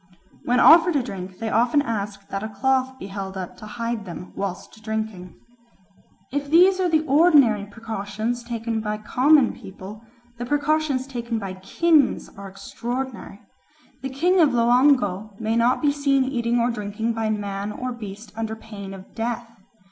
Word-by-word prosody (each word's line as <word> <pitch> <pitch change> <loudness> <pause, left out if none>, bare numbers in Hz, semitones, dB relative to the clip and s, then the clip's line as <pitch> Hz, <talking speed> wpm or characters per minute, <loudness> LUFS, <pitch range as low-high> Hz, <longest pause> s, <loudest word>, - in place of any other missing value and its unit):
When 245 +1 +2
offered 335 +1 +7
a 275 - +2
drink 190 -5 -7
they 225 0 -3
often 240 +6 +3
ask 200 -4 -4
that 195 - -3
a 220 - -4
cloth 260 +4 0
may 260 - -23
be - - -7
held 195 -1 -6
up 185 -2 -6
to 215 - -10
hide 230 0 -3
them 180 0 -9
whilst 200 +2 -6
drinking. 220 -4 -4 1.0
If 285 +1 -3
these 365 +4 +5
are 365 -1 +2
the 315 -1 +2
ordinary 275 - +4
precautions 220 +2 -4
taken 230 -1 -3
by 210 0 -2
common 255 +5 +3
people, 195 +3 -11 0.4
the 240 - -3
precautions 290 -1 +1
taken 240 -3 -4
by 195 -3 -5
kings 290 - +2
are 200 0 -9
extraordinary. 240 +3 -6 0.6
The 270 - -4
king 350 +8 +2
of 315 -4 +6
Loango 235 -5 +2
may 225 0 -1
not 240 +5 +2
be 290 - +4
seen 280 -2 +2
eating 240 -2 0
or 235 +1 +2
drinking 215 +1 -3
by 225 -1 -1
man 205 -1 -3
or 255 +4 -4
beast 210 -2 -9
under 220 0 -3
pain 200 -3 -9
of 190 0 -14
death. 235 +1 -3
230 Hz, 165 wpm, -23 LUFS, 205-265 Hz, 1.0 s, offered